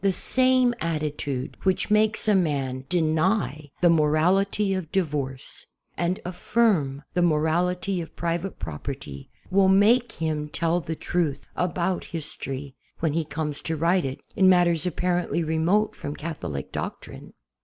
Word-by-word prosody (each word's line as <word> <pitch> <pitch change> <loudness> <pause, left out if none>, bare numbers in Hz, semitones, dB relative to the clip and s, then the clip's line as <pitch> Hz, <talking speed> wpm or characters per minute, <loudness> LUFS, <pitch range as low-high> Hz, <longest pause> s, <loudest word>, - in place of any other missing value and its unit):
The 195 - +4
same 255 +4 +3
attitude 150 -5 -3
which 190 +2 0
makes 215 +1 +2
a 210 - +5
man 140 -8 0
deny 160 -2 +1
the 175 - +6
morality 180 +6 +2
of 185 -4 -4
divorce 145 -8 -3 0.3
and 175 +2 -1
affirm 180 -7 +1
the 180 - +1
morality 175 +3 +1
of 165 - -10
private 170 +3 -2
property 75 -4 -7 0.2
will 190 0 +4
make 225 +5 +4
him 155 -2 -2
tell 170 +3 0
the 160 +1 -4
truth 155 -4 -1
about 180 +1 -1
history, 140 -4 -5 0.3
when 160 -3 0
he 165 +1 +1
comes 150 -1 -4
to 160 -1 -3
write 170 +3 +2
it, 135 -1 -4 0.2
in 190 -1 +5
matters 175 -2 +4
apparently 175 0 0
remote 165 +7 +1
from 145 +1 -6
Catholic 90 - -5
doc - - -4
trine. - - -12
170 Hz, 140 wpm, -25 LUFS, 150-185 Hz, 0.3 s, the